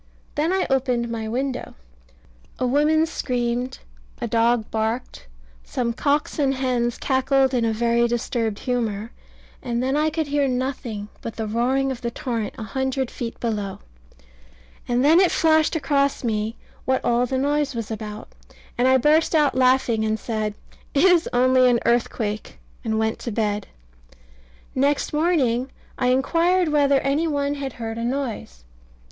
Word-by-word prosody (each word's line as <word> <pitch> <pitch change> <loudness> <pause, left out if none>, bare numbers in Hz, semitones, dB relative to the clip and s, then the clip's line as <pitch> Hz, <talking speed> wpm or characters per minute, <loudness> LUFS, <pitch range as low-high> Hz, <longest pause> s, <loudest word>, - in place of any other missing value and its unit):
Then 310 +4 0
I 380 0 +1
opened 250 -3 0
my 225 -1 -3
window 255 +3 -3 0.8
a 255 - -1
woman 300 +5 +3
screamed, 245 -5 -2 0.4
a - - -2
dog 230 0 +1
barked, 220 - -3 0.4
some 235 - -2
cocks 290 +5 0
and 270 -2 +2
hens 245 -2 0
cackled 265 0 +2
in 240 -2 +2
a 225 - +1
very 235 +1 +2
disturbed 230 -2 -1
humour, 225 -3 -2 0.5
and 240 0 -2
then 265 +2 0
I 305 +1 +2
could 315 0 -2
hear 285 -1 +1
nothing 250 -5 -3
but 230 - -6
the 220 - -3
roaring 255 +5 +1
of 250 -2 -6
the 235 - -2
torrent 230 -3 -4
a - - -5
hundred 265 +2 -2
feet 230 -1 -6
below. 210 -4 -2 1.1
And 245 +2 +1
then 320 +4 +6
it 375 -2 +5
flashed 315 0 +3
across 280 -3 +1
me 220 -1 -1 0.3
what 260 0 0
all 240 +1 +2
the 260 - -1
noise 285 0 0
was 230 -1 -4
about; 210 -1 -6 0.5
and 250 - +4
I 260 0 +6
burst 305 +5 +3
out 295 -3 +4
laughing 255 -3 +3
and 220 0 0
said 215 -2 -3 0.4
"It 280 - +4
is 360 -3 +4
only 255 +1 +4
an 240 -1 +3
earthquake," 225 -3 -1 0.3
and 220 -1 -1
went 220 0 0
to 235 - -4
bed 210 -1 -1 1.1
Next 280 +3 +1
morning 275 -6 +1 0.3
I 250 - +2
inquired 335 +7 +2
whether 285 -2 +3
any 285 +5 +1
one 285 -2 0
had 275 -3 -5
heard 225 -1 -5
a - - -3
noise. 235 - -4
250 Hz, 155 wpm, -23 LUFS, 230-280 Hz, 1.1 s, then